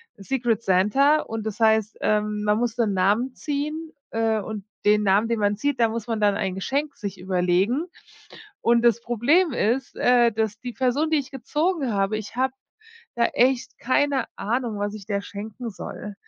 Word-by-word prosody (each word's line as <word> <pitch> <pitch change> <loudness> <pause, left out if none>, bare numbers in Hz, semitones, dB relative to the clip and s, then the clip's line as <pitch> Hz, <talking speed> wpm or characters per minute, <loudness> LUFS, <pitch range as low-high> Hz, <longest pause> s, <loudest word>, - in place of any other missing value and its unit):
Secret 230 +1 -1
Santa 270 +12 +4
und 220 -1 -6
das 220 +1 -4
heißt, 220 -1 +2
ähm, 210 0 0
man 210 0 +2
muss 240 0 -1
'nen 220 -4 +1
Namen 210 +8 +1
ziehen, 305 +2 -4 0.2
äh, 225 -1 +1
und 210 0 -6 0.2
den 210 0 +4
Namen, 200 +3 +3
den 230 -2 -1
man 205 0 +1
zieht, 285 +2 -1
da 230 -1 +4
muss 230 0 -5
man 225 -2 -2
dann 205 -1 +3
ein 190 -2 -2
Geschenk 280 +8 -2
sich 200 -4 -6
überlegen 185 - +1 0.8
und 235 0 +3
das 235 -1 +4
Problem 275 - +2
ist, 245 +3 -1
äh, 245 -1 +4
dass 215 -1 -2
die 245 -1 -6
Person, 270 +6 0
die 315 - +3
ich 265 -2 -5
gezogen 295 - -1
habe 195 +1 0
ich 215 +1 -7
hab 260 +1 +1 0.6
da 235 -1 +2
echt 255 0 +1
keine 270 0 +1
Ahnung, 230 0 -2
was 205 +1 -2
ich 205 -2 -9
der 200 -2 -1
schenken 215 +4 -7
soll, 205 +2 -8
225 Hz, 180 wpm, -24 LUFS, 210-260 Hz, 0.8 s, Santa